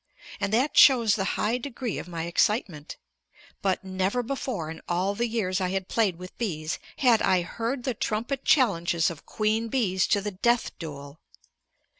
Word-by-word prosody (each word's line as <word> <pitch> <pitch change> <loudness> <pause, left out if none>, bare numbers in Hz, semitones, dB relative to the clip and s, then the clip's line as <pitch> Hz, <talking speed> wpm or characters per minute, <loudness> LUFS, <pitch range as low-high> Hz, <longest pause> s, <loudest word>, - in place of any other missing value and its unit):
And 200 - -1
that 255 +7 +1
shows 235 -6 +7
the 200 - 0
high 230 +4 0
degree 250 -4 -4
of - - -8
my 170 -2 -4
excitement. 170 - 0 0.6
But 190 -1 0
never 190 +5 -1
before 230 - -3
in 160 - -9
all 180 +3 0
the 235 +4 -1
years 200 -5 -1
I 185 - 0
had 190 0 -2
played 215 -6 +1
with 180 +2 -11
bees 160 -9 -3 0.2
had 240 -4 +4
I 180 -2 +3
heard 235 +8 -3
the 255 - -1
trumpet 235 +5 -2
challenges 175 - +2
of 160 - -12
queen 220 +1 0
bees 200 -7 +1
to 205 - +3
the 205 +1 -4
death 235 +5 0
duel. 145 -3 -8
205 Hz, 170 wpm, -26 LUFS, 180-235 Hz, 0.6 s, shows